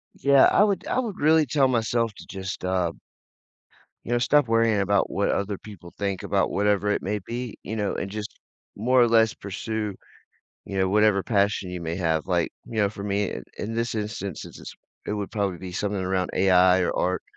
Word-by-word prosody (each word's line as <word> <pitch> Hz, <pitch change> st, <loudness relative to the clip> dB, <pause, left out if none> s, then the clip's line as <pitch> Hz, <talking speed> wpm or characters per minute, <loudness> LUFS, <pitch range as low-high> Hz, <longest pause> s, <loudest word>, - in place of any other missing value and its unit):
Yeah. 140 Hz, -1 st, +5 dB
I -, -, +5 dB
would 200 Hz, -2 st, 0 dB
I 255 Hz, -, 0 dB
would 220 Hz, -7 st, -4 dB
really 155 Hz, +1 st, +4 dB
tell 135 Hz, 0 st, +2 dB
myself 115 Hz, -2 st, 0 dB
to -, -, -12 dB
just, 95 Hz, 0 st, -6 dB
uh 90 Hz, -2 st, 0 dB, 1.1 s
you 120 Hz, -, -6 dB
know, 120 Hz, -, +3 dB
stop 145 Hz, +2 st, +3 dB
worrying 115 Hz, -2 st, +3 dB
about 100 Hz, 0 st, +1 dB
what 100 Hz, -, 0 dB
other 100 Hz, 0 st, -1 dB
people 90 Hz, -5 st, -12 dB
think 100 Hz, -2 st, -2 dB
about -, -, +1 dB
whatever 105 Hz, 0 st, +1 dB
it -, -, 0 dB
may 105 Hz, +2 st, -2 dB
be, 120 Hz, -1 st, -5 dB
you 110 Hz, -, -5 dB
know, 105 Hz, -2 st, -1 dB
and 100 Hz, -, -4 dB
just 105 Hz, 0 st, -6 dB, 0.4 s
more 125 Hz, +4 st, +3 dB
or 120 Hz, -, +5 dB
less 115 Hz, -1 st, +4 dB
pursue, 105 Hz, +1 st, -4 dB, 0.7 s
you 100 Hz, -, -4 dB
know, 95 Hz, 0 st, +2 dB
whatever 105 Hz, 0 st, +3 dB
passion 100 Hz, -2 st, +1 dB
you 90 Hz, -1 st, -5 dB
may 85 Hz, 0 st, -3 dB
have, 80 Hz, -4 st, 0 dB
like, 90 Hz, -3 st, +1 dB, 0.2 s
you 115 Hz, -, -8 dB
know, 105 Hz, -2 st, +3 dB
for 100 Hz, -, -8 dB
me, 100 Hz, -1 st, -1 dB
i -, -, -5 dB, 0.2 s
in 110 Hz, +2 st, -4 dB
this 115 Hz, +1 st, -1 dB
instance, 105 Hz, -5 st, -4 dB
it's -, -, -11 dB
just -, -, -10 dB, 0.3 s
it -, -, -2 dB
would 105 Hz, -2 st, -4 dB
probably 100 Hz, -4 st, -1 dB
be 90 Hz, 0 st, -8 dB
something 100 Hz, +1 st, -2 dB
around 95 Hz, -1 st, -1 dB
AI 95 Hz, -1 st, +5 dB
or -, -, 0 dB
art, 90 Hz, +1 st, 0 dB
105 Hz, 205 wpm, -25 LUFS, 95-115 Hz, 1.1 s, Yeah